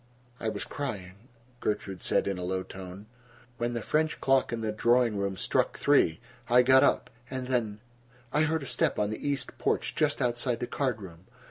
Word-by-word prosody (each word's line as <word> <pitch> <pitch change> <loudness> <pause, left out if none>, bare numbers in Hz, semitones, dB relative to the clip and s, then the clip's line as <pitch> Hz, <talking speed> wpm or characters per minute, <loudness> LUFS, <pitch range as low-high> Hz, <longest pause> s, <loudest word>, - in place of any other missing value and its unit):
"I 110 - -1
was 105 -2 -3
crying," 105 -6 -6 0.3
Gertrude 95 -5 -2
said - - +2
in 100 -2 -2
a - - -4
low 95 +1 -1
tone. 95 +2 -9 0.5
"When 120 0 -1
the 115 -2 -3
French 155 +1 0
clock 135 -1 +3
in 115 -1 -2
the 110 -1 -1
drawing 120 +1 +3
room 100 -1 -2
struck - - +1
three, 80 - +3 0.3
I 125 +1 +6
got 130 +1 +6
up, - - +2 0.2
and 130 -1 -4
then—I 120 +2 -3
heard 155 -1 +1
a - - -6
step - - +1
on 105 0 0
the 110 - -3
east 140 -3 -4
porch, - - 0
just 150 -1 +1
outside 120 -1 0
the - - -1
card 120 -4 -2
room. 85 0 -12
120 Hz, 190 wpm, -29 LUFS, 100-130 Hz, 0.5 s, I